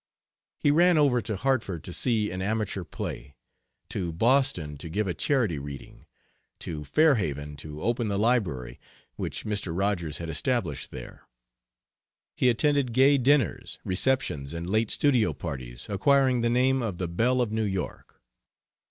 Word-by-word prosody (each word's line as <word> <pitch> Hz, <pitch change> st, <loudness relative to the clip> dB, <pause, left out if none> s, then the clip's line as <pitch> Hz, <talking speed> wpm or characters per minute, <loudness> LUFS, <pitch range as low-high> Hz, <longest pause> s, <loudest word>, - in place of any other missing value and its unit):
He 145 Hz, -, +2 dB
ran 175 Hz, +2 st, +5 dB
over 135 Hz, -5 st, +3 dB
to 110 Hz, -, -3 dB
Hartford 110 Hz, -, -1 dB
to 90 Hz, -, -7 dB
see 110 Hz, -2 st, 0 dB
an 90 Hz, +1 st, -4 dB
amateur 105 Hz, -1 st, -1 dB
play; 70 Hz, -3 st, -7 dB, 0.5 s
to 90 Hz, -4 st, -3 dB
Boston 115 Hz, -, +1 dB
to 85 Hz, -, -7 dB
give 105 Hz, +6 st, -1 dB
a 90 Hz, -, -1 dB
charity 115 Hz, -, +1 dB
reading; 70 Hz, -1 st, -10 dB, 0.5 s
to 75 Hz, -3 st, -5 dB
Fair 155 Hz, -, +4 dB
Haven 75 Hz, -, -3 dB
to 75 Hz, +1 st, -8 dB
open 120 Hz, 0 st, 0 dB
the 100 Hz, -1 st, -1 dB
library 90 Hz, -, 0 dB, 0.4 s
which -, -, -5 dB
Mr. 105 Hz, -5 st, -2 dB
Rogers 95 Hz, -6 st, -1 dB
had 85 Hz, -, -5 dB
established 80 Hz, -, -2 dB
there; 60 Hz, -, -10 dB, 1.1 s
he 125 Hz, -, +3 dB
attended 140 Hz, 0 st, +1 dB
gay 135 Hz, +3 st, +5 dB
dinners, 135 Hz, -2 st, +1 dB
receptions, 90 Hz, -, 0 dB
and 85 Hz, +1 st, -5 dB
late 110 Hz, +3 st, +1 dB
studio 130 Hz, -7 st, +3 dB
parties, 65 Hz, -6 st, -7 dB
acquiring 130 Hz, +5 st, +3 dB
the 115 Hz, -, +2 dB
name 130 Hz, +2 st, +2 dB
of 105 Hz, -7 st, -3 dB
the 90 Hz, -, -2 dB
"Belle 120 Hz, +9 st, +1 dB
of 120 Hz, -4 st, 0 dB
New 110 Hz, 0 st, -1 dB
York." 95 Hz, -3 st, -4 dB
105 Hz, 150 wpm, -27 LUFS, 85-125 Hz, 1.1 s, ran